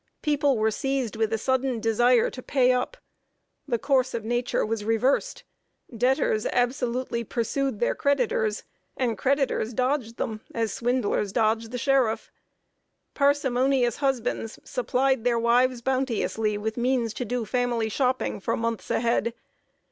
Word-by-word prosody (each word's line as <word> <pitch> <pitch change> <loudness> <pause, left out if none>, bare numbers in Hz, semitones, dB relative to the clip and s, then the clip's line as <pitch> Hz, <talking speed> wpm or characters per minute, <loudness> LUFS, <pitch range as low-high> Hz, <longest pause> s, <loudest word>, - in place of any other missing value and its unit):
People 290 -3 +2
were 220 0 +2
seized 270 -2 -2
with 220 0 0
a 225 - +1
sudden 260 +1 0
desire 235 +2 +3
to 255 - -8
pay 255 -1 +3
up. 250 - -1 0.7
The 240 -4 +1
course 260 0 +1
of 225 -2 -4
nature 240 +2 0
was 220 -1 -2
reversed; 245 - 0 0.5
debtors 240 -2 +1
absolutely 245 -1 -1
pursued 240 +1 -2
their 240 - +1
creditors, 240 -6 0 0.3
and 240 -3 0
creditors 265 -2 0
dodged 255 -3 -1
them 215 -1 -3
as 225 -3 -1
swindlers 235 -4 0
dodge 225 +1 +1
the 250 +2 -5
sheriff. 255 -3 +1 0.8
Parsimonious 265 -3 +2
husbands 260 -5 -1
supplied 255 0 0
their 240 -1 +2
wives 240 +1 +2
bounteously 230 -5 0
with 220 +2 -3
means 240 -2 0
to 250 - -3
do 245 0 -2
family 240 0 0
shopping 255 +2 0
for - - -1
months 230 -1 -3
ahead. 235 0 0
245 Hz, 135 wpm, -26 LUFS, 225-260 Hz, 0.8 s, desire